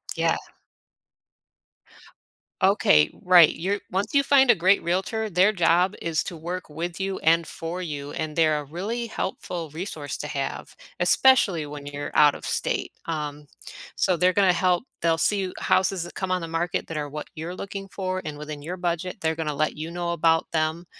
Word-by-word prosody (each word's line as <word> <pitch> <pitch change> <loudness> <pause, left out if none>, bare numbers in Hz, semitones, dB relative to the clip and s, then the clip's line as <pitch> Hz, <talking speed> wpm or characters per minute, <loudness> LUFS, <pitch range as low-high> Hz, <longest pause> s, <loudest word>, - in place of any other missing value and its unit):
Yeah. - - +1 2.3
Okay, 75 0 +5
right, 180 -3 +7
you're 200 +4 -2
once 200 +6 -1
you 280 0 +4
find 270 -3 +5
a - - +8
great 190 +3 +3
realtor, 195 +5 -1
their 185 +3 +4
job 175 0 +3
is 165 -2 0
to 170 - -7
work 175 +2 -5
with 170 +4 -5
you, 195 0 -2
and 165 +1 +3
for 170 +3 -5
you, 145 -4 -5
and 155 -1 -3
they're 155 -2 +3
a - - -8
really 205 - -4
helpful 175 -6 -4
resource 155 -4 -5
to 150 - -4
have, 140 -2 -4 0.3
especially 185 - +4
when 145 -1 -8
you're 145 0 -5
out 150 -1 +6
of - - -9
state, - - -2
um, 150 -2 -4 0.5
so, 185 -2 +2
they're 180 +2 +3
gonna 190 -1 +4
help 180 +3 +2 0.2
they'll 165 -1 +2
see 205 - +2
you 185 -1 -4
houses 185 -2 +1
that 175 - -9
come 190 -1 -3
on 180 -1 +1
the 165 - -5
market 165 +1 -2
that 165 - -5
are 145 -1 -3
what 150 +1 -6
you're 165 +3 -5
looking 195 +1 -6
for 185 -1 -3
and 150 -1 -5
within 150 -1 -7
your 180 +3 -5
budget, 175 +2 -2
they're 160 0 0
gonna 160 -2 -2
let 155 +2 0
you 160 +2 -5
know 175 0 -2
about 165 -1 +2
them, 160 +2 0
170 Hz, 185 wpm, -25 LUFS, 155-185 Hz, 2.3 s, a